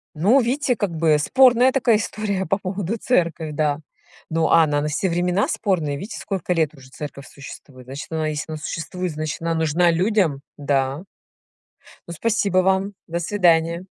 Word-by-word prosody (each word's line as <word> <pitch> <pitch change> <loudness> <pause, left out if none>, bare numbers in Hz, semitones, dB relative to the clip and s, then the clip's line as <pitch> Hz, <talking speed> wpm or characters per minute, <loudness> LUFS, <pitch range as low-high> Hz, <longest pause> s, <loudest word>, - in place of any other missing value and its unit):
Ну, 205 - +4
видите, 255 +1 0
как 205 -4 -2
бы 155 -2 +3
спорная 255 - +5
такая 235 -4 +3
история 205 -2 -2
по 195 - +1
поводу 195 +2 -3
церкви, 170 -9 0
да. 150 0 0 0.5
Ну, 160 0 +1
а 165 - +6
она 145 -2 0
на 150 - -1
все 150 +6 -1
времена 180 +3 +1
спорная. 165 -9 -1
Видите, 200 +10 -7
сколько 190 -3 -4
лет 160 -3 0
уже 130 -2 -16
церковь 140 -1 -8
существует. 135 -2 -12
Значит, 135 +4 -7
она 160 -1 -1
если 155 +1 -4
она - - -4
существует, 175 +3 -4
значит 155 +1 -4
она 165 0 -1
нужна 160 +2 +2
людям. 180 -5 +1 0.2
Да. 140 +2 -1 1.1
Ну, - - -5
спасибо 200 0 0
вам. 190 +2 +1
До 170 +1 -3
свидания. 170 -2 +2
170 Hz, 165 wpm, -22 LUFS, 150-200 Hz, 1.1 s, а